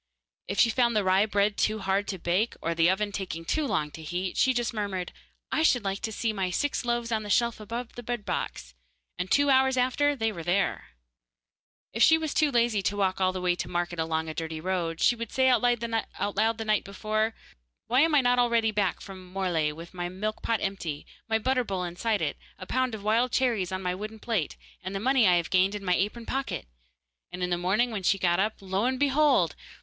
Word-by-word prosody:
If 200 Hz, -, -3 dB
she 230 Hz, -, +5 dB
found 235 Hz, 0 st, +2 dB
the 210 Hz, -, +2 dB
rye 190 Hz, +3 st, +3 dB
bread 205 Hz, 0 st, +1 dB
too 215 Hz, -, +1 dB
hard 195 Hz, 0 st, 0 dB
to 190 Hz, -, -3 dB
bake, 180 Hz, +6 st, 0 dB
or 170 Hz, -, -1 dB
the 165 Hz, +1 st, +3 dB
oven 205 Hz, +2 st, 0 dB
taking 180 Hz, -4 st, -5 dB
too 305 Hz, -, 0 dB
long 150 Hz, -, -1 dB
to 160 Hz, -, -10 dB
heat, 180 Hz, +4 st, -3 dB
she 260 Hz, -, +3 dB
just 240 Hz, -1 st, -1 dB
murmured, 200 Hz, -4 st, -3 dB, 0.4 s
'I -, -, +1 dB
should 250 Hz, -7 st, +3 dB
like 195 Hz, 0 st, -2 dB
to 220 Hz, -, -3 dB
see 220 Hz, +1 st, -1 dB
my 190 Hz, -3 st, -1 dB
six 285 Hz, +11 st, -1 dB
loaves 240 Hz, -1 st, -1 dB
on 220 Hz, -1 st, +1 dB
the 210 Hz, -, -7 dB
shelf 235 Hz, +2 st, +2 dB
above 230 Hz, +3 st, -6 dB
the 245 Hz, -, -8 dB
bread 240 Hz, -2 st, -4 dB
box,' -, -, -4 dB, 0.5 s
and 180 Hz, +1 st, -2 dB
two 285 Hz, 0 st, +4 dB
hours 265 Hz, 0 st, +4 dB
after 270 Hz, +4 st, +2 dB
there 220 Hz, -9 st, -2 dB
they 180 Hz, +4 st, +2 dB
were. -, -, -6 dB, 1.1 s
If 225 Hz, -, -3 dB
she 320 Hz, +5 st, +7 dB
was 315 Hz, -2 st, -3 dB
too 305 Hz, -, +3 dB
lazy 235 Hz, -4 st, +2 dB
to 205 Hz, +1 st, -1 dB
walk 190 Hz, -1 st, 0 dB
all 185 Hz, 0 st, +3 dB
the 185 Hz, 0 st, -5 dB
way 180 Hz, -1 st, +2 dB
to 175 Hz, -, -4 dB
market 175 Hz, -1 st, -2 dB
along 160 Hz, 0 st, -1 dB
a 160 Hz, -, -4 dB
dirty 160 Hz, 0 st, -4 dB
road, 170 Hz, -1 st, -2 dB
she 240 Hz, -, +4 dB
would 230 Hz, -1 st, -6 dB
say 260 Hz, 0 st, +3 dB
out 250 Hz, -, +4 dB
loud 245 Hz, -2 st, +2 dB, 0.8 s
the 225 Hz, -, -4 dB
night 215 Hz, -1 st, +2 dB
before, 215 Hz, +3 st, -2 dB, 0.5 s
'Why 250 Hz, +2 st, +2 dB
am 320 Hz, 0 st, +3 dB
I 285 Hz, -, +6 dB
not 245 Hz, 0 st, +3 dB
already 235 Hz, -2 st, +3 dB
back 205 Hz, -3 st, 0 dB
from 185 Hz, -2 st, -11 dB
Morlaix 170 Hz, -6 st, 0 dB
with 165 Hz, +2 st, -10 dB
my 175 Hz, -1 st, -4 dB
milk 210 Hz, +4 st, -4 dB
pot 230 Hz, -2 st, 0 dB
empty, 175 Hz, -7 st, -4 dB, 0.2 s
my 220 Hz, -, +3 dB
butter 255 Hz, +3 st, +1 dB
bowl 190 Hz, -5 st, -3 dB
inside 180 Hz, +3 st, -1 dB
it, 145 Hz, -, -2 dB, 0.2 s
a 185 Hz, -, -8 dB
pound 255 Hz, +2 st, 0 dB
of 205 Hz, -, -9 dB
wild 230 Hz, +4 st, +2 dB
cherries 230 Hz, -8 st, +1 dB
on 185 Hz, 0 st, -3 dB
my 180 Hz, 0 st, 0 dB
wooden 215 Hz, +4 st, -6 dB
plate, 215 Hz, -7 st, -2 dB, 0.2 s
and 190 Hz, +1 st, -6 dB
the -, -, -1 dB
money 255 Hz, 0 st, +3 dB
I 180 Hz, -, +5 dB
have 170 Hz, -2 st, -1 dB
gained 190 Hz, +2 st, +3 dB
in 200 Hz, -1 st, -6 dB
my 180 Hz, -, +2 dB
apron 210 Hz, +6 st, -1 dB
pocket?' 270 Hz, -, -3 dB, 0.7 s
and 180 Hz, 0 st, -5 dB
in 180 Hz, -, -1 dB
the -, -, +3 dB
morning 210 Hz, +7 st, +1 dB
when 210 Hz, -3 st, -3 dB
she 195 Hz, +2 st, +2 dB
got 175 Hz, -2 st, +1 dB
up, 210 Hz, +3 st, +1 dB
lo 195 Hz, +3 st, -1 dB
and 260 Hz, 0 st, 0 dB
behold! 275 Hz, -, +3 dB
205 Hz, 230 wpm, -27 LUFS, 180-240 Hz, 1.1 s, she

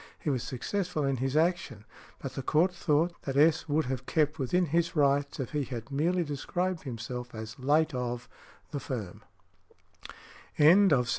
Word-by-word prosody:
He 150 Hz, -, -2 dB
was 130 Hz, -3 st, -1 dB
successful 170 Hz, +6 st, -2 dB
in 135 Hz, -1 st, 0 dB
his 135 Hz, +4 st, -1 dB
action. 155 Hz, -, 0 dB, 0.3 s
But 135 Hz, -, -6 dB
the -, -, -4 dB
Court 160 Hz, +7 st, +2 dB
thought 165 Hz, 0 st, +1 dB
that 135 Hz, -1 st, -3 dB
S. 160 Hz, +2 st, +4 dB
would 150 Hz, +1 st, +2 dB
have 130 Hz, 0 st, -4 dB
kept 150 Hz, -1 st, +1 dB
within 175 Hz, +8 st, +1 dB
his 170 Hz, +2 st, 0 dB
rights 140 Hz, -1 st, +2 dB
if 130 Hz, -, -3 dB
he 150 Hz, -2 st, 0 dB
had 120 Hz, 0 st, -7 dB
merely 170 Hz, +6 st, +1 dB
described 170 Hz, +4 st, -3 dB
himself 125 Hz, 0 st, -6 dB
as 110 Hz, +3 st, -7 dB
"late 150 Hz, +4 st, +2 dB
of" 125 Hz, -1 st, -3 dB, 0.4 s
the 145 Hz, -, -3 dB
firm. 110 Hz, -10 st, -5 dB
145 Hz, 155 wpm, -29 LUFS, 125-160 Hz, 0.4 s, S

